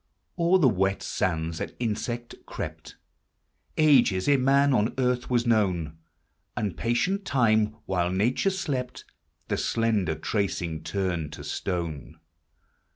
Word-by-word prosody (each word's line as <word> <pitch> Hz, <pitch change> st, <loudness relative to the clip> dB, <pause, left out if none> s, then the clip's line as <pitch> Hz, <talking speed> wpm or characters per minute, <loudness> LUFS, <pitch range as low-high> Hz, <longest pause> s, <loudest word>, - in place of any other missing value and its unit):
O'er 170 Hz, +2 st, +4 dB
the 160 Hz, -7 st, +4 dB
wet 95 Hz, -3 st, +1 dB
sands 80 Hz, -2 st, -2 dB
an -, -, -4 dB
insect 120 Hz, +1 st, -3 dB
crept -, -, -7 dB, 0.8 s
Ages 130 Hz, -12 st, +4 dB
ere 145 Hz, -, +5 dB
man 140 Hz, +2 st, +4 dB
on 110 Hz, -1 st, +1 dB
earth 125 Hz, -1 st, 0 dB
was 120 Hz, -1 st, +1 dB
known 90 Hz, -9 st, +1 dB, 0.3 s
— -, -, -45 dB
And 100 Hz, -6 st, -2 dB
patient 180 Hz, -, 0 dB
Time, 110 Hz, -, +2 dB
while 90 Hz, -2 st, 0 dB
Nature 110 Hz, -, +1 dB
slept, 140 Hz, -10 st, -3 dB, 0.4 s
The -, -, -1 dB
slender 110 Hz, -8 st, 0 dB
tracing 85 Hz, -2 st, -2 dB
turned 90 Hz, -6 st, -2 dB
to -, -, -8 dB
stone. 85 Hz, -7 st, -4 dB
110 Hz, 125 wpm, -26 LUFS, 90-125 Hz, 0.8 s, ere